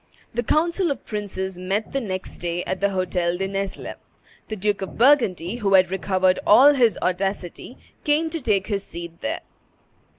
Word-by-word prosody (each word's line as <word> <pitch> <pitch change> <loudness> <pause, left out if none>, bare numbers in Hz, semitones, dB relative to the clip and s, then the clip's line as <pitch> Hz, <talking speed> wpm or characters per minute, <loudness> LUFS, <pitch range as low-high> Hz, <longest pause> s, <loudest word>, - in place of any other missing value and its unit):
The 240 - 0
council 340 - +1
of 280 - -4
princes 190 -3 -4
met 195 +4 -2
the 275 - -1
next 190 -4 -5
day 175 0 -2
at 185 - -3
the 200 +1 +2
Hotel 180 -2 -1
de 195 +1 -2
Nesle. 195 0 -4 0.5
The 215 - -4
Duke 205 0 -1
of 195 - -6
Burgundy, 230 - +3
who 200 -4 +2
had 185 -1 +4
recovered 190 -1 +1
all 270 +7 +7
his 235 -8 +3
audacity, 190 +4 -3 0.3
came 310 +2 +1
to 330 -1 -4
take 200 -6 +1
his 200 -2 -2
seat 170 -2 -9
there. 110 - -3
195 Hz, 170 wpm, -23 LUFS, 185-235 Hz, 0.5 s, all